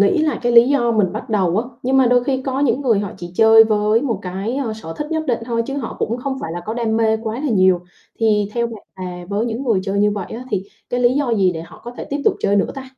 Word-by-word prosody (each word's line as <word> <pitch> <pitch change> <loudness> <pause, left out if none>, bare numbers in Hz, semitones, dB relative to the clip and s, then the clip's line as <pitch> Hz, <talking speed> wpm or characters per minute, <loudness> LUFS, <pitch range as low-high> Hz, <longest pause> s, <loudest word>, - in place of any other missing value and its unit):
nghĩ 200 +8 +4
là 310 -1 +1
cái 240 0 +1
lý 235 +1 +7
do 240 -5 +2
mình 205 -5 +1
bắt 215 +4 -6
đầu 190 -3 +1
á, 230 - 0 0.2
nhưng 260 +2 +1
mà 260 -2 +5
đôi 245 0 +3
khi 265 -2 -1
có 270 0 -2
những 255 -2 +2
người 240 -7 +2
họ 205 -2 -4
chỉ 175 0 -8
chơi 225 +1 +7
với 215 +1 +2
một 230 -8 -1
cái, 195 +7 -4
ơ, 255 -6 -2
sở 165 -7 -8
thích 295 - -3
nhất 315 -1 0
định 240 -3 +1
thôi 230 -1 -1
chứ 275 - -4
họ 260 -5 -5
cũng 230 +2 -1
không 265 +1 -3
phải 165 - -5
là 175 - -4
có 220 - -3
đam 225 -2 0
mê 220 -1 +2
quá 220 -1 -3
là 295 -2 -1
nhiều, 185 -4 +4 0.4
thì 210 -3 +2
theo 235 -1 +1
bạn 225 -3 -9
là 180 -1 -6
với 205 +3 -1
những 235 +2 -3
người 220 -7 +2
chơi 200 +1 -2
như 210 0 +3
vậy 205 -3 -4
á 245 +3 -6
thì 200 -3 0 0.3
cái 245 0 0
lý 245 +1 +3
do 280 -3 0
gì 190 -4 +2
để 160 - -6
họ 165 - -14
có 240 - -6
thể - - -6
tiếp 285 - -2
tục - - +4
chơi 200 - +2
nữa 200 - +1
ta? 270 - -6
225 Hz, 300 wpm, -19 LUFS, 200-250 Hz, 0.4 s, lý